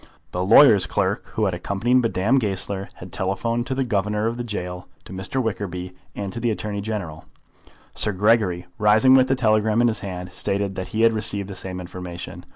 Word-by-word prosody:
The 90 - -2
lawyer's 105 0 +7
clerk - - -1
who 110 - +1
had 95 - 0
accompanied 110 +8 +1
Madame 115 +3 +2
Goesler 100 -2 -3
had 90 -1 -11
telegraphed 115 +6 -1
to 130 - -2
the 135 - 0
Governor 105 -2 -1
of 115 +1 -1
the 120 - -3
gaol, 90 -5 -5 0.2
to - - -10
Mr. 95 +7 -3
Wickerby, 90 -4 -4 0.2
and 100 -2 -5
to 115 - -5
the 120 0 0
Attorney 105 -1 -3
General. 100 -7 -5 0.7
Sir 105 - +2
Gregory, 100 -3 +2
rising 110 +5 +5
with 130 -1 +6
the 135 - +2
telegram 110 -2 +2
in 120 0 +4
his 110 - -2
hand, 90 -2 -6
stated 100 +1 -1
that 95 0 -5
he 110 +1 -1
had 115 0 +5
received 105 -2 -1
the 100 - -7
same 95 -1 -6
information. 90 -1 -8
105 Hz, 195 wpm, -23 LUFS, 95-115 Hz, 0.7 s, lawyer's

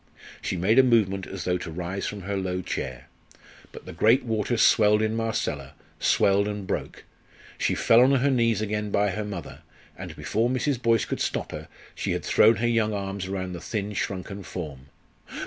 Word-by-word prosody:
She 95 - -2
made 105 +8 +4
a - - +8
movement 100 -6 +2
as 95 -1 -6
though 90 0 0
to 85 - -6
rise 90 +4 -4
from 105 -1 -5
her 100 +2 -3
low 95 -1 -2
chair. 65 -5 -5 0.6
But - - -11
the 90 - -8
great 110 +10 +4
waters 110 0 0
swelled 105 -1 +5
in 110 0 0
Marcella 110 -12 -2 0.2
swelled 100 +1 +3
and 105 -1 -4
broke. - - -4 0.6
She - - +1
fell 115 +1 +5
on 130 +2 +5
her 140 +1 +3
knees 115 -4 +2
again 105 0 -2
by 100 0 +1
her 105 +2 -3
mother, 100 -4 -7 0.4
and - - -8
before 115 +3 0
Mrs. 130 0 -1
Boyce 115 -3 +3
could - - -4
stop - - -2
her - - -7 0.3
she - - -2
had - - -4
thrown 110 +2 +5
her 115 +4 0
young 110 -2 +1
arms 100 -1 -4
close 95 - -6
round 95 -1 -3
the 85 - -7
thin, 105 0 -3
shrunken 100 +1 -4
form. 75 -9 -7
105 Hz, 195 wpm, -26 LUFS, 95-115 Hz, 0.6 s, a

